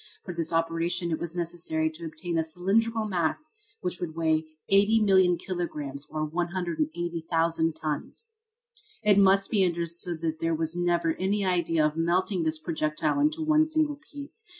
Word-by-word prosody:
For 180 - -5
this 165 -1 -2
operation 165 +1 0
it 160 - -1
was 170 +1 -5
necessary 165 -2 -1
to 165 +1 -9
obtain 165 +2 -5
a 165 - +2
cylindrical 215 +7 0
mass 190 - -1 0.3
which 180 -1 -2
would 160 -3 -4
weigh 160 -1 +1 0.3
80,000,000 195 -3 +5
kilograms, 150 -7 -4
or 155 0 -2
180,000 170 - -1
tons. 155 - -4 0.8
It 205 -2 +5
must 195 0 +4
be 205 -3 +3
understood 170 -1 -2
that 160 -1 -2
there 165 0 0
was 160 +1 -2
never 175 -2 +1
any 195 +2 0
idea 170 -4 +2
of 150 +1 -1
melting 180 +3 +1
this 160 -1 0
projectile 155 - -1
in 295 +1 +5 0.2
one 310 0 +4
single 310 -2 +1
piece. 290 +9 -7
170 Hz, 150 wpm, -27 LUFS, 160-190 Hz, 0.8 s, 80,000,000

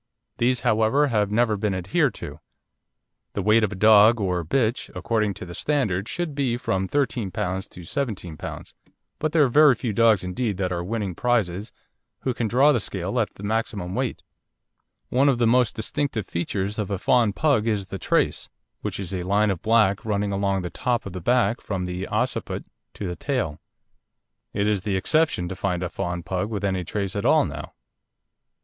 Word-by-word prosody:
These, 125 +1 +2
however, 110 +7 +3
have 105 -4 +1
never 110 +1 +2
been 100 -1 -1
adhered 95 +1 +1
to. - - -8 0.9
The 100 - -2
weight 110 +3 +4
of 105 - +1
a - - -5
dog 110 +3 +6
or 90 -4 0
bitch, 115 - 0
according 110 -4 0
to - - -7
the 85 - -9
standard, 105 -8 0
should 175 -4 -3
be 135 -4 0
from 95 -5 -1
13 125 -5 0
lb. 95 +2 -3
to 90 - -11
17 95 - -3
lb., - - -8 0.5
but 155 0 0
there 155 -2 +4
are - - +4
very 145 +1 +6
few 115 0 -3
dogs 110 -3 +4
indeed 100 +3 -2
that 90 -2 -1
are 85 -1 -2
winning 100 -1 -3
prizes 105 -3 0 0.5
who 130 - -1
can 115 -1 -1
draw 135 +7 +5
the 125 - +2
scale 95 +3 -3
at 110 - -1
the 100 - -11
maximum 100 -4 -2
weight. - - -2 0.9
One 135 +3 +3
of 130 - +2
the 120 - +2
most 125 +1 +3
distinctive 115 -1 -2
features 95 +4 -3
of 105 - -2
a 100 - -1
fawn 115 +2 +3
Pug 130 -2 +1
is 105 -3 0
the 95 0 -7
trace, - - 0 0.3
which - - -3
is 95 -1 -5
a 90 - -2
line 100 +3 +2
of 90 - -4
black 110 -3 +3
running 105 -2 -1
along 100 -1 0
the 90 - -4
top 125 -2 -1
of 100 - -7
the 90 - -5
back 120 +3 +2
from 95 -3 -3
the 90 +1 -4
occiput - - -2 0.3
to 105 - -5
the 90 -1 -3
tail. 120 - -2 0.9
It 100 +1 0
is 105 -3 +1
the 100 0 -1
exception 130 - +1
to 95 - -5
find 90 -2 -1
a 90 - -2
fawn 90 -2 -3
Pug 95 +4 -2
with 105 -2 -4
any 95 -2 0
trace 100 +1 -3
at - - -2
all - - +4
now. - - -7
105 Hz, 195 wpm, -24 LUFS, 95-120 Hz, 0.9 s, dog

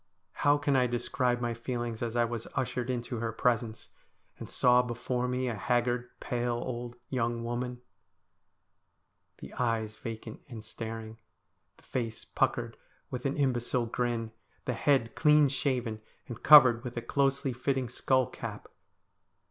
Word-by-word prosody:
How 145 0 +3
can 145 -1 +1
I 125 -1 +4
describe 120 +1 0
my 120 -1 0
feelings 120 -1 -4
as 120 -1 -2
I 120 -1 +3
was 115 -1 -4
ushered 125 0 -1
into 120 0 -2
her 115 0 -2
presence, 115 -1 0 0.5
and - - -7
saw 125 0 +5
before 125 +1 -2
me 125 +1 -1
a 120 - -1
haggard, 120 +2 0
pale, 120 -1 -1
old 120 0 -4
young 120 -2 -1
woman? 125 +1 -3 1.5
The - - -10
eyes 115 -3 -1
vacant 110 -1 -7
and 110 -4 -8
staring, 110 0 -7 0.6
the - - -23
face 115 -3 -4
puckered - - 0 0.3
with 125 +2 -2
an 135 - -2
imbecile 125 -3 +1
grin; 115 -1 -2 0.3
the 125 - 0
head 120 -1 +2
clean 150 -2 +5
shaven 125 -5 -1 0.3
and 120 -1 -7
covered 125 -6 +8
with 120 -1 -6
a 120 - -2
closely 135 +1 +1
fitting 130 +1 -1
skull 130 +1 +2
cap. - - -7
120 Hz, 145 wpm, -30 LUFS, 115-130 Hz, 1.5 s, covered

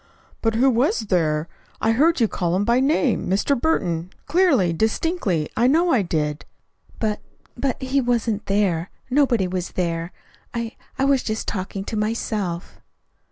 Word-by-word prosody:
"But 225 -1 +1
who 250 +4 +4
was 265 - +2
there? 165 -6 0 0.3
I 225 - +2
heard 305 +8 +3
you 230 - +4
call 175 -3 -1
him 200 +2 +1
by 235 +2 +3
name, 270 - +1
'Mr. 200 +9 +2
Burton,' 175 - 0 0.2
clearly, 285 - +3
distinctly. 220 - 0
I 235 +2 +3
know 335 +6 +3
I 250 - +4
did." 150 -4 -2 0.5
"But 215 -2 -1 0.4
but 265 +1 -1
he 270 +1 0
wasn't 230 -4 0
there. 195 -4 +1 0.2
Nobody 250 -8 +3
was 180 0 -4
there. 170 -1 -2 0.4
I 235 -1 -3 0.2
I 270 - +2
was 275 -2 +3
just 220 -1 -3
talking 195 -1 -3
to 220 - -5
myself." 210 -5 -3
220 Hz, 155 wpm, -22 LUFS, 180-260 Hz, 0.5 s, who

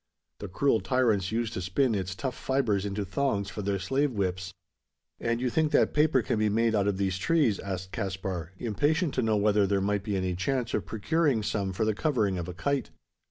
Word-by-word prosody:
The 100 - -5
cruel 110 +6 +2
tyrants 110 -8 +1
used 115 0 -1
to 95 - -3
spin 110 +7 +1
its 95 -2 -2
tough 130 +4 -3
fibres 115 -8 0
into 100 0 -3
thongs 100 -2 -1
for 105 - -5
their 100 0 0
slave 135 +10 0
whips." 95 -3 -2 0.7
"And 115 0 -1
you 125 -1 -1
think 155 +1 +1
that - - +3
paper 150 -4 +3
can 110 - -1
be 110 0 +2
made 115 +2 +2
out 100 -2 +2
of 100 -2 0
these 95 -1 -1
trees?" 140 - +2
asked 95 -1 -5
Caspar, 95 -3 -4
impatient 145 - 0
to - - +1
know 110 -2 +2
whether 105 -1 +3
there 100 0 +1
might 100 +1 0
be 100 -2 -1
any 95 -1 -1
chance 120 +6 -1
of - - -1
procuring 140 +1 +1
some 100 -2 -1
for 100 +4 -1
the 110 - +2
covering 105 - 0
of 85 - -4
a 90 - -5
kite. 140 +10 -1
105 Hz, 210 wpm, -28 LUFS, 95-130 Hz, 0.7 s, that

